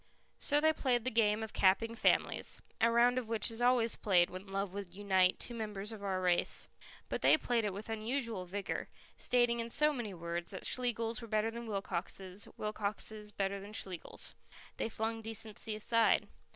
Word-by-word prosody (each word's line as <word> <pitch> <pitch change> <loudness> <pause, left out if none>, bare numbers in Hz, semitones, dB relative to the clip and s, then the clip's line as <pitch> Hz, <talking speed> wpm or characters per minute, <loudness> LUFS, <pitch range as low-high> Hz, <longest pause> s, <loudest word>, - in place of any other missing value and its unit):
So 290 0 +4
they 315 +1 +4
played 250 -6 +1
the 255 - -1
game 220 -1 +3
of 220 - -6
Capping 200 +4 +3
Families, 230 - +1 0.2
a 230 - +6
round 240 +2 +4
of 230 -3 -7
which 225 -1 +1
is 225 +1 -5
always 245 -2 +4
played 180 -4 +3
when 185 +2 -8
love 195 -1 -2
would 195 -3 -6
unite 190 -2 +3
two 240 - -5
members 210 -2 -4
of 215 -2 -8
our 190 -2 0
race. 180 -1 +1 0.4
But - - -3
they - - +7
played 240 -6 0
it 205 - 0
with 205 +3 -7
unusual 225 -2 -2
vigour, 195 +2 -4 0.3
stating 240 -1 +2
in 230 0 -3
so 300 +5 +4
many 225 -8 -4
words 170 0 -3
that 190 - -4
Schlegels 235 -1 -1
were 230 - -8
better 215 +1 +1
than 235 0 -7
Wilcoxes, 195 -1 -4
Wilcoxes 210 0 -4
better 200 -1 -1
than 200 +2 -10
Schlegels. 185 -5 -3 0.4
They - - -1
flung 225 +1 -2
decency 220 0 -5
aside. 230 +1 +3
215 Hz, 180 wpm, -34 LUFS, 195-230 Hz, 0.4 s, they